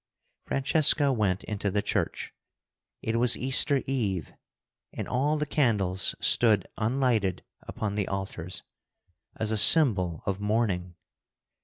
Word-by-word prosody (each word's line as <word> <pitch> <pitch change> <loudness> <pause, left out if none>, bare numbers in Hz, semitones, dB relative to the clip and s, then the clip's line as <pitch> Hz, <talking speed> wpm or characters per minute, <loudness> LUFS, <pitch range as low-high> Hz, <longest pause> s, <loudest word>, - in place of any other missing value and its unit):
Francesca 140 0 +2
went 100 -5 -1
into 105 -1 -4
the 100 +1 -2
church. - - -3 0.7
It 115 +1 -2
was 120 0 +3
Easter 135 +1 +3
Eve, 105 - -3 0.6
and - - -7
all 145 +5 -1
the 150 - -2
candles 105 -11 0
stood 110 -3 +3
unlighted 115 -5 -1 0.2
upon 105 -2 -5
the 100 -2 -3
altars, 95 -2 -6 0.7
as 110 -1 -3
a 110 - 0
symbol 100 - +5
of 100 0 -3
mourning. 100 -5 -2
110 Hz, 120 wpm, -26 LUFS, 95-130 Hz, 0.7 s, symbol